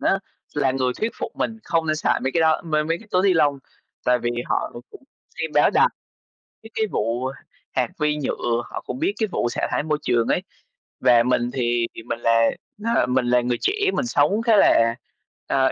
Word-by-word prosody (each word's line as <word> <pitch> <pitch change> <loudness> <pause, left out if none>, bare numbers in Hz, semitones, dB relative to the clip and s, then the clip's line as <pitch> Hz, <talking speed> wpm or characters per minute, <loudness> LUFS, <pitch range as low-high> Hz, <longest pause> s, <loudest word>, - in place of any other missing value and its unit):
á - - +2 0.4
là 135 - +2
người 130 -1 0
thuyết 225 +1 0
phục - - -6
mình 225 - -2
không 165 -1 0
nên 155 - +1
xài 155 - +1
mấy 130 - -1
cái 170 - +2
đó, 160 -1 +3
m 165 - -9
mấy 155 +2 +1
cái 225 - -17
túi 185 +1 +2
ni 195 -2 +4
lông, 145 -4 +3 0.5
tại 125 0 +3
vì 120 - -2 0.2
họ - - -1 0.2
cũng - - -14 0.4
xem - - -2
báo - - +5
đài - - +4 0.8
mấy 225 - -11
cái 220 - +1
vụ 120 +4 -1 0.4
hạt 125 -2 +1
vi 150 0 +1
nhựa, 120 -4 -1
họ - - -6
cũng 260 - -5
biết 365 +5 +1
cái 220 - 0
vụ 120 - 0
xả - - -2
thải - - 0
môi 150 -1 0
trường 115 -1 +1
ấy. - - +1 0.6
Và 120 -1 +5
mình 120 -1 +1
thì 120 -2 0
thì 115 - -8
mình 115 0 -4
là 115 -1 +3 0.3
là 230 +3 +1
mình 125 0 +1
là 125 0 +4
người 120 0 -1
trẻ, 395 - +2 0.2
mình 265 - 0
sống 200 0 +2
khá 230 -1 +4
là, 115 -11 +4 0.5
ờ, 130 -1 +2
135 Hz, 220 wpm, -23 LUFS, 120-170 Hz, 0.8 s, báo